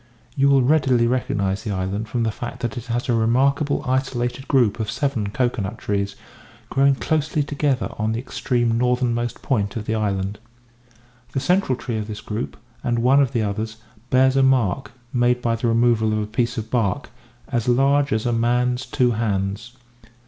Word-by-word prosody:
You 140 -1 +3
will 135 -2 +5
readily 130 -4 +3
recognise 105 -5 0
the - - -5
island 100 +3 -2
from 120 +1 -1
the 110 - +1
fact 120 +3 -7
that 120 -1 -2
it 120 -2 -6
has 120 0 -2
a 120 - +2
remarkable 135 +6 +2
isolated 130 0 -1
group 120 -6 +2
of 110 -1 -2
seven 115 -3 -1
cocoa 120 +1 0
nut 100 +4 -4
trees 100 0 -2 0.6
growing 140 0 +4
closely 155 +1 0
together 140 -3 0
on 110 +1 0
the 115 - -1
extreme 120 -2 0
northernmost 125 -1 0
point 100 -6 0
of 110 -2 -4
the 110 - -1
island. 100 -2 -1 0.9
The - - 0
central 180 -3 +2
tree 115 -4 -3
of 105 - -5
this 105 -1 -6
group, 110 +3 -5 0.3
and 120 -1 0
one 130 +4 +4
of 135 -3 +1
the 115 -4 0
others, 110 +2 -3 0.3
bears 130 +1 +4
a 135 - +4
mark 130 -3 +2 0.2
(made 125 0 +2
by 115 -2 0
the 115 +1 -1
removal 115 -1 +3
of - - 0
a 105 - -1
piece 115 +3 -1
of 110 0 -5
bark) 110 -7 0 0.4
as 120 -1 -1
large 140 +3 +3
as 110 +1 0
a 120 - +1
man's 125 +2 +1
two 125 -1 +2
hands. 105 +1 -2
120 Hz, 185 wpm, -22 LUFS, 110-130 Hz, 0.9 s, will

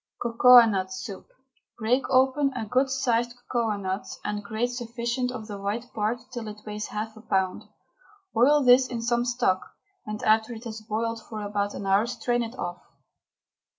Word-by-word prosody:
COCOANUT 230 -5 +6
SOUP. 190 +1 -7 0.5
Break 240 +4 +1
open 265 +2 +3
a 225 - -3
good 255 +5 +1
sized 240 -3 0
cocoanut 205 -5 -1 0.2
and 210 0 -2
grate 220 +4 -2
sufficient 240 +1 -2
of 240 -4 -6
the 205 -2 -7
white 220 +5 -4
part 215 +2 0
till 240 -3 -5
it 210 0 -9
weighs 210 0 -4
half 215 +1 -5
a 220 - -12
pound. 190 -1 -1 0.7
Boil 275 +5 +5
this 255 +1 +6
in 240 -2 -4
some 240 0 +1
stock, 240 -6 +1 0.5
and 210 0 -5
after 220 +2 +3
it 225 0 -9
has 220 -2 -7
boiled 225 +1 -2
for 215 -2 -7
about 205 0 -2
an 200 - -6
hour 195 +4 +3
strain 240 0 -1
it 230 +2 -5
off. 175 0 -5
230 Hz, 165 wpm, -26 LUFS, 210-245 Hz, 0.7 s, COCOANUT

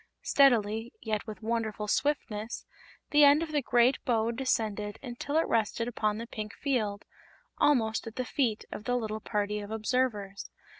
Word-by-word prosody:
Steadily, 230 -4 +3
yet 215 0 -3
with 215 -2 -8
wonderful 220 -2 -2
swiftness, 230 -4 -1 0.5
the 295 0 +6
end 290 +3 +7
of 320 - -6
the 295 -2 +1
great 245 +1 +3
bow 230 -2 +1
descended 220 -4 -1
until 265 +4 -3
it 325 - +2
rested 230 +1 0
upon 215 -3 -1
the 230 - -5
pink 215 -3 -6
field 215 -8 -1 0.5
almost 225 -6 +2
at 225 - -8
the 255 - -2
feet 235 -5 0
of 210 - -7
the 245 - +1
little 220 -2 -3
party 210 -1 -1
of 205 0 -7
observers. 215 -3 -1
225 Hz, 160 wpm, -29 LUFS, 210-255 Hz, 0.5 s, end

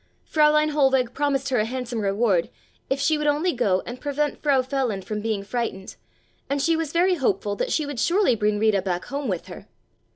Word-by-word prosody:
Fräulein 305 0 +3
Hohlweg 265 -4 +2
promised 275 -1 0
her 255 -3 +1
a 215 - +1
handsome 245 -1 -4
reward 195 -3 +1 0.4
if 270 - 0
she 300 +2 +2
would 300 - -1
only 300 +5 +1
go 200 -7 +1
and 245 +1 -8
prevent 290 0 -2
Frau 275 -3 +3
Feland 255 -7 -2
from 210 -1 -4
being 215 -2 -2
frightened, 205 -3 -4 0.5
and 280 +1 0
she 330 +4 +2
was 320 -2 -2
very 360 +3 +3
hopeful 205 - 0
that - - -2
she 310 - +1
would 285 -4 -5
surely 345 - +3
bring 210 -1 0
Rita 210 -2 +2
back 180 -2 -3
home 280 +1 -4
with 185 -5 -2
her. - - -11
260 Hz, 200 wpm, -24 LUFS, 210-290 Hz, 0.5 s, Fräulein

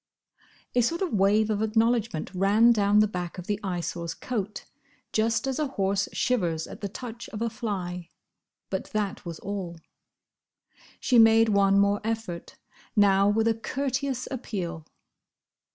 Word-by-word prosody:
—" - - -34 0.3
A 245 - +4
sort 335 +10 0
of 370 - -2
wave 210 +2 +3
of 210 0 0
acknowledgment 225 -5 +1
ran 205 +5 +4
down 205 -2 +4
the 215 - +4
back 180 -3 -5
of 180 - -7
the 205 0 -1
Eyesore's 175 -2 -3
coat, 210 -4 -4 0.5
just 225 +3 +1
as 270 +1 -2
a 305 - +1
horse 195 -6 0
shivers 175 -10 0
at - - -11
the 200 - -3
touch 235 +2 -8
of 210 - -6
a 230 0 -1
fly; 180 -6 -4 0.6
but - - -2
that 210 -2 -2
was 165 -1 -5
all. 190 -4 -5 1.2
She 245 -2 +4
made 225 0 +6
one 200 -1 +4
more 200 +1 +3
effort: 220 -6 -4 0.4
now 200 -1 +5
with 220 +2 +2
a 225 - +4
courteous 265 +2 -2
appeal. 175 - -5
210 Hz, 150 wpm, -27 LUFS, 190-230 Hz, 1.2 s, made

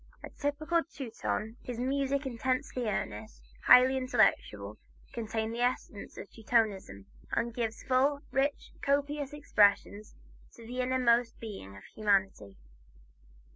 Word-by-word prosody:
A - - -8
typical 310 +4 0
Teuton, 230 -5 -4
his 245 -2 -6
music, 275 +2 0
intensely 255 -1 -2
earnest, 105 - -4 0.2
highly 260 +1 +8
intellectual, 200 - +1 0.3
contains 220 -1 -3
the 235 - -3
essence 245 -4 -2
of - - -7
Teutonism, 210 - -1 0.3
and 235 0 0
gives 225 -2 -3
full, 275 +2 +2
rich, 275 +2 -1
copious 285 0 0
expression 210 -8 +2 0.5
to 230 - -13
the 250 +2 -3
inmost 245 -2 +2
being 195 - -8
of - - -13
humanity. 195 - 0
235 Hz, 115 wpm, -30 LUFS, 210-265 Hz, 0.5 s, highly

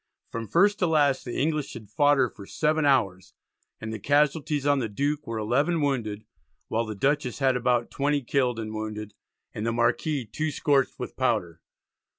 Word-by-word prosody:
From 115 -1 -4
first 205 - +3
to 180 - +2
last 145 -4 +2
the 120 - -4
English 150 0 -1
had 110 -3 -10
fought 145 +4 +4
her 130 - +3
for 100 -3 -12
seven 155 0 +1
hours, 100 -10 +1 0.4
and 110 0 -5
the 110 - -5
casualties 145 +2 +1
on 145 -1 +3
the 115 -4 -2
Duke 145 +8 -2
were 115 -1 -3
11 140 +10 +1
wounded, 115 -8 -1 0.4
while 115 +1 0
the 110 - -5
Dutchess 135 +2 0
had 135 -2 +2
about 125 -1 +1
20 145 0 0
killed 125 -1 +1
and 110 -1 -5
wounded, 105 -1 -5 0.4
and 105 - -5
the 115 - 0
Marquis 120 +4 0
2 155 +9 -3
scorched 140 -2 +1
with 125 - -6
powder. 105 -10 -1
130 Hz, 180 wpm, -26 LUFS, 110-145 Hz, 0.4 s, fought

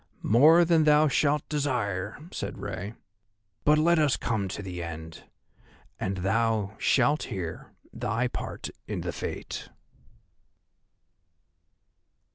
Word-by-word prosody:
"More 155 +9 +6
than 165 -2 +4
thou 150 0 +5
shalt 145 +1 +1
desire," 120 -10 -1
said - - -5
Rei; 100 +6 -5 0.7
"but 150 +1 +5
let 170 +2 +4
us 150 -4 +3
come 110 -4 -1
to 95 +2 -5
the 90 -2 -5
end, 80 -1 -8 0.7
and 95 0 -2
thou 110 +2 0
shalt 140 +4 +3
hear 85 -4 -6 0.2
thy 120 +3 -1
part - - -6 0.2
in - - -3
the - - -4
Fate." - - -5
115 Hz, 110 wpm, -27 LUFS, 95-150 Hz, 0.7 s, More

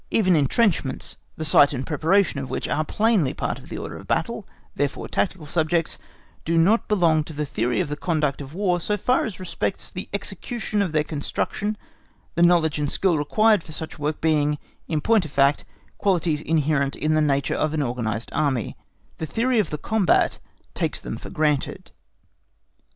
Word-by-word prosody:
Even 185 -5 +3
entrenchments, 155 - +1 0.2
the 155 - -2
site 145 -1 +6
and 130 -1 -3
preparation 160 +1 +2
of 135 - -5
which - - -3
are 155 - 0
plainly 210 - +1
part - - -2
of - - -15
the - - -5
order - - -6
of - - -12
battle, - - -1 0.3
therefore 145 0 -2
tactical 185 -5 -1
subjects, 160 +2 0 0.4
do 165 +1 0
not 195 +8 +4
belong 170 -7 +3
to 160 - -9
the 150 0 -2
theory 120 -4 -1
of - - -2
the 150 - -3
conduct 150 -4 -1
of 140 +3 -9
War 185 -2 +1
so 210 +5 -1
far 250 +6 +2
as 215 -6 -6
respects 185 -1 -3
the - - -7
execution 220 -4 -3
of 190 -5 0
their 155 -1 +2
construction 180 +7 -3 0.6
the 170 - 0
knowledge 170 -3 +4
and 145 -1 -1
skill 190 -3 +2
required 210 +8 +3
for 155 - -8
such 160 0 -5
work 150 +1 -2
being, 150 -2 +2 0.3
in 155 -2 -1
point 220 +2 +3
of - - -7
fact, 140 0 +3 0.3
qualities 170 -6 +1
inherent 150 -3 +1
in 155 +1 0
the 155 - +3
nature 140 -2 +1
of 155 0 0
an 150 - +1
organised 115 -3 -3
Army; 135 -6 0 0.4
the 160 - -3
theory 235 - +1
of 210 - +1
the 150 - -3
combat 200 +2 +2 0.3
takes - - -1
them - - -5
for - - -9
granted. 150 -3 -1
155 Hz, 185 wpm, -24 LUFS, 145-185 Hz, 0.6 s, site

